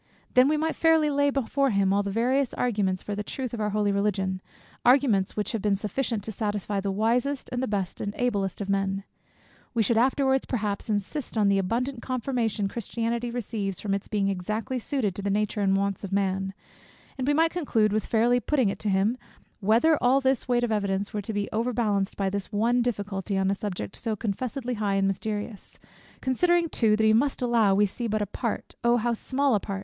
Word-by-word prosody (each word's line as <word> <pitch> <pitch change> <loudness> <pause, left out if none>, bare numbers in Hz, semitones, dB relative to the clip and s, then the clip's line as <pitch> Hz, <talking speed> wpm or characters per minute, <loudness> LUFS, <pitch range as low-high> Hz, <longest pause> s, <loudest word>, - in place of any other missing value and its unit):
Then 255 +1 +6
we 305 +1 +2
might 320 +1 -1
fairly 320 -2 +3
lay 285 0 +3
before 275 0 +1
him 195 -3 +2
all 200 - +3
the 200 - -3
various 250 +5 +1
arguments 200 -6 0
for 205 - -4
the 205 - -2
truth 250 +3 -5
of 230 - -3
our 210 - 0
holy 205 0 +1
religion; 195 -2 0 0.4
arguments 245 -8 +3
which 210 - -1
have 225 - -2
been 205 -1 +2
sufficient 210 +2 -2
to 220 - -5
satisfy 205 -1 -2
the 200 0 -2
wisest, 235 +7 0
and 250 -1 -1
the 260 - -1
best, 195 -4 -2
and 205 - -2
the 245 - -4
ablest 200 -6 -1
of 200 - -3
men. 195 0 0 0.7
We 225 - +3
should 225 +2 +2
afterwards 265 +1 +2
perhaps 210 -4 -2
insist 220 +6 -2
on 205 -2 +4
the 200 0 +3
abundant 235 +6 -1
confirmation 235 -5 -1
Christianity 235 +2 -3
receives 215 -5 -3
from 200 -2 -2
its 200 0 -2
being 205 -2 0
exactly 215 +7 -2
suited 235 -5 -1
to 200 - -5
the 200 - -2
nature 210 +1 0
and 195 -1 +3
wants 200 0 -1
of 200 - -5
man; 195 -1 0 0.6
and 260 - -1
we 290 - +4
might 325 +1 +3
conclude, 225 - +1
with 215 - -1
fairly 235 +2 +3
putting 260 -4 +1
it - - -4
to 215 - -1
him, 200 +6 +1 0.4
whether 230 +10 +3
all 255 +2 +4
this 265 -2 0
weight 245 -1 +2
of 240 - 0
evidence 200 -1 -1
were 210 - -2
to 205 - -5
be 205 -1 -1
overbalanced 220 -4 0
by 195 - 0
this 200 +1 -3
one 230 +4 +2
difficulty, 205 -4 -2
on 190 0 +2
a - - +2
subject 185 - -5
so 220 -1 -2
confessedly 245 +4 -3
high 205 -3 0
and 195 0 +2
mysterious, 205 +2 -4 0.4
considering 345 +6 +2
too 220 -7 +3
that 220 - 0
he 220 0 +5
must 260 +3 +1
allow, 230 -5 +3
we 205 +1 +4
see 230 +4 -4
but 215 -1 0
a - - -1
part 225 +3 -4
(O 235 0 +4
how 240 +1 0
small 270 +4 0
a 210 - +3
part!) 195 0 -5
215 Hz, 215 wpm, -26 LUFS, 200-245 Hz, 0.7 s, Then